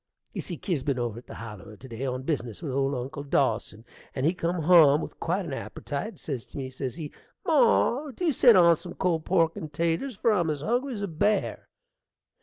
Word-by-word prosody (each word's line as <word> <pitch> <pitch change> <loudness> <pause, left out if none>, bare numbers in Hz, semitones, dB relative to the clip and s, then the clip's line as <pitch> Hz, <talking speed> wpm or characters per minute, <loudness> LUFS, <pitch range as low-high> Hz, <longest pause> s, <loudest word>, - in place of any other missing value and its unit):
You - - -3
see, - - -5
Kier's 175 -9 -2
been 135 -1 -1
over 120 -1 -3
to - - -34
the - - -9
Holler 105 -1 -9
to 130 - -12
day 120 +2 -5
on 130 0 -3
bizness 130 - -3
with 145 - -3
old 135 +1 0
Uncle 135 +4 -5
Dawson, 115 -5 -1 0.3
and 130 - -1
he 165 - +3
come 170 -1 -2
hum 155 -4 +7
with - - -7
quite 185 +3 -1
an 150 - -5
appertite: 145 +9 -5
says 135 -7 -5
to - - -11
me, 130 -1 -4
says 130 -1 -4
he, 155 -3 -7 0.3
"Mar, 280 -1 +3
dew 335 +5 0
set 245 -4 +6
on 170 -2 +7
some 175 - -9
cold 165 -4 0
pork 165 -3 +2
and 160 -7 -7
'taters, 170 - -1
for 225 +3 +2
I'm 175 -6 +1
as 150 -2 -2
hungry 245 - -1
as 205 - -4
a - - -1
bear." 200 +5 0
155 Hz, 215 wpm, -27 LUFS, 135-190 Hz, 0.3 s, hum